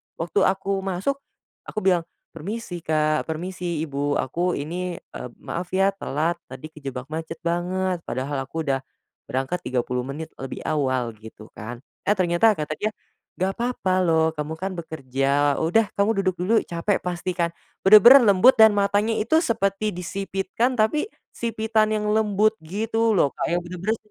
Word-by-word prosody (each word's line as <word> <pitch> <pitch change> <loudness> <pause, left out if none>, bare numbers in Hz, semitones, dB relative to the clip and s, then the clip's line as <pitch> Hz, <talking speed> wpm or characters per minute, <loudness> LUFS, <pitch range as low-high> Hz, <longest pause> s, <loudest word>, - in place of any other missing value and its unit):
Waktu 170 +5 -1
aku 195 +1 0
masuk, 195 +9 -2 0.5
aku 215 - -4
bilang, 180 -3 +2 0.2
"Permisi, 195 0 -6
Kak, 155 -1 0
permisi, 170 0 -3
Ibu. 145 -1 -1
Aku 175 +7 -1
ini, 175 +5 -4
eee, 125 - -9
maaf 175 +1 -4
ya 195 +1 +4
telat, 170 -3 -2
tadi 135 +4 -9
kejebak 135 -2 -7
macet 160 +1 -5
banget, 180 +2 -1
padahal 135 +1 -3
aku 160 +3 -4
udah 135 -3 0 0.5
berangkat 135 +7 -2
30 125 0 -1
menit 155 +4 -6
lebih 135 -1 -6
awal." 130 -5 0
Gitu 110 0 -13
kan. 120 +3 -8 0.2
Eh, 205 - +4
ternyata 185 +4 +3
kata 150 -2 -4
dia, 215 - 0 0.5
"Enggak 185 +1 0
apa-apa 235 -6 -1
loh, 160 -1 +3
kamu 150 +1 -3
kan 190 +1 -3
bekerja. 140 -2 0
Udah, 210 +7 +3
kamu 200 +1 +3
duduk 185 -1 +1
dulu. 185 +5 +1
Cape 170 +4 -1
pasti 180 0 -2
kan?" 170 -2 0 0.3
Benar-benar 215 +7 +9
lembut 205 +6 +7
dan 220 0 +9
matanya 205 +2 +2
itu 315 +9 +3
seperti 215 - 0
disipitkan, 195 +7 -2
tapi 265 - +1 0.2
sipitan 220 -1 0
yang 210 0 -1
lembut 215 0 +3
gitu 225 +7 0
loh, 140 -5 +3
Kak, - - -2
yang 175 - +1
benar-benar 185 +5 -2
175 Hz, 155 wpm, -24 LUFS, 150-205 Hz, 0.5 s, Benar-benar